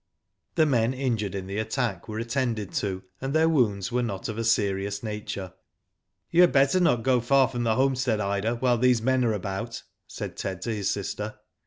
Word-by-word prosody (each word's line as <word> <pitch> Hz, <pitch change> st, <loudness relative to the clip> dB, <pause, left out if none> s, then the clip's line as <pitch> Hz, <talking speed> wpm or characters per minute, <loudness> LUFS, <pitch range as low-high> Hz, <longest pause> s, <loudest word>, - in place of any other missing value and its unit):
The 160 Hz, -, +4 dB
men 125 Hz, -3 st, +2 dB
injured 115 Hz, -7 st, -1 dB
in 95 Hz, -1 st, -4 dB
the 100 Hz, +2 st, -4 dB
attack 110 Hz, -4 st, -2 dB
were 110 Hz, -1 st, -5 dB
attended 115 Hz, -3 st, -2 dB
to, 95 Hz, -2 st, -2 dB, 0.2 s
and 135 Hz, +3 st, -2 dB
their 160 Hz, +1 st, +4 dB
wounds 120 Hz, -, +1 dB
were 125 Hz, +1 st, +1 dB
aot 105 Hz, -3 st, -3 dB
of 110 Hz, +1 st, -4 dB
a -, -, -1 dB
serious 100 Hz, -2 st, 0 dB
nature. 105 Hz, -4 st, -5 dB, 0.8 s
"You 170 Hz, -, +5 dB
had 180 Hz, -, +6 dB
better 140 Hz, +5 st, +4 dB
not 150 Hz, -10 st, +3 dB
go 125 Hz, -1 st, +3 dB
far 135 Hz, +2 st, +4 dB
from 120 Hz, 0 st, -3 dB
the 110 Hz, -1 st, +2 dB
homestead, 130 Hz, -4 st, +1 dB
Ida, 100 Hz, +3 st, 0 dB
while 120 Hz, 0 st, +1 dB
these 125 Hz, -2 st, +3 dB
men 130 Hz, +1 st, +2 dB
are 115 Hz, -2 st, +2 dB
about," 105 Hz, +4 st, -4 dB, 0.2 s
said -, -, -6 dB
Ted 95 Hz, -2 st, -4 dB
to 115 Hz, -, -2 dB
his 100 Hz, -2 st, -1 dB
sister. 105 Hz, +1 st, -3 dB
115 Hz, 195 wpm, -26 LUFS, 100-130 Hz, 0.8 s, had